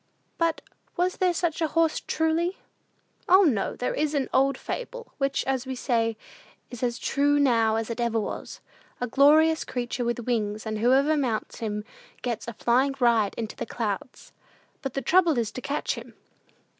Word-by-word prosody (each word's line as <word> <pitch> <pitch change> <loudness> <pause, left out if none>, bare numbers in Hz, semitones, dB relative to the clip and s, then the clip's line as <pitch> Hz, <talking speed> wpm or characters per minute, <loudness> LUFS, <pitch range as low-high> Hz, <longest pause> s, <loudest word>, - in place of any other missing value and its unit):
But 335 -1 +1 0.4
was 360 +1 +1
there 365 -1 +3
such 340 -1 -1
a 320 - +2
horse, 325 +1 +1
truly?" 325 +3 0 0.7
"O, 375 +3 +7
no; 240 - +1
there 250 - -2
is 300 0 -1
an 275 -2 -1
old 275 +1 +3
fable, - - -6
which, 275 0 0
as 265 -1 -1
we 260 - -3
say, 230 -3 0 0.5
is 245 - -8
'as 240 -1 0
true 290 +1 +2
now 230 -6 +3
as 225 +1 -2
it 230 - -5
ever 230 -1 +1
was,' 215 - -6 0.4
of 245 - -2
a - - -28
glorious 310 +4 +5
creature 245 0 -3
with 240 0 -1
wings, 215 -3 -1
and 215 -1 -3
whoever 270 +6 +4
mounts 250 -7 -2
him 210 -2 -3 0.4
gets 235 -3 -3
a 235 - -4
flying 255 +5 +2
ride 230 -5 +3
into 220 -2 -4
the - - -5
clouds. 220 +1 -4 0.5
But 270 -4 -5
the 275 - -2
trouble 345 -5 +4
is 230 -3 0
to 255 - -7
catch 285 +3 -2
him!" - - -10
260 Hz, 180 wpm, -26 LUFS, 230-310 Hz, 0.7 s, O